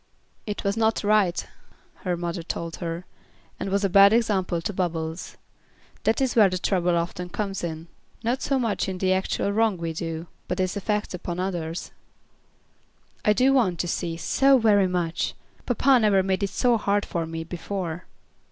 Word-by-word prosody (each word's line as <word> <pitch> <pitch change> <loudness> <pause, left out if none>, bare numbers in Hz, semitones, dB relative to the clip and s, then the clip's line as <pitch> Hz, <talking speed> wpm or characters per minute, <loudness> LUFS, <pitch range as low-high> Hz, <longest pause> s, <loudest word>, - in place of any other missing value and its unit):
"It 210 - -4
was 200 0 0
not 225 -1 +1
right," 205 -4 +2 0.5
her 180 -2 -2
mother 170 0 -3
told 165 0 -5
her, 170 0 -4 0.5
"and - - -3
was 200 +1 +1
a - - +4
bad 200 +2 +7
example 195 -7 +1
to 185 +5 -3
Bubbles. 165 -2 -3 0.7
That 220 - +2
is 265 -2 0
where 210 -4 +6
the 185 - -2
trouble 180 -2 +1
often 175 +1 -3
comes 195 -1 -3
in. 165 -1 -4 0.4
Not 245 +4 0
so 275 - +1
much 225 -5 0
in 185 - -4
the 185 0 +2
actual 190 +1 0
wrong 220 -2 +2
we 165 -1 -3
do, 165 0 -4 0.2
but 180 - -3
its 185 +1 0
effect 210 +1 -1
upon 175 0 -4
others." 175 -3 -3 1.3
"I 210 - +4
do 255 +6 +4
want 210 -10 +2
to 175 - -3
see, 165 -1 -2
so 270 +9 +4
very 205 -5 +4
much. 175 -2 -1 0.3
Papa 260 +2 +4
never 205 -4 +4
made 190 0 0
it 200 - 0
so 240 +4 +2
hard 205 -1 0
for 165 -2 -3
me 165 0 -4
before." 175 0 -5
190 Hz, 175 wpm, -25 LUFS, 170-210 Hz, 1.3 s, bad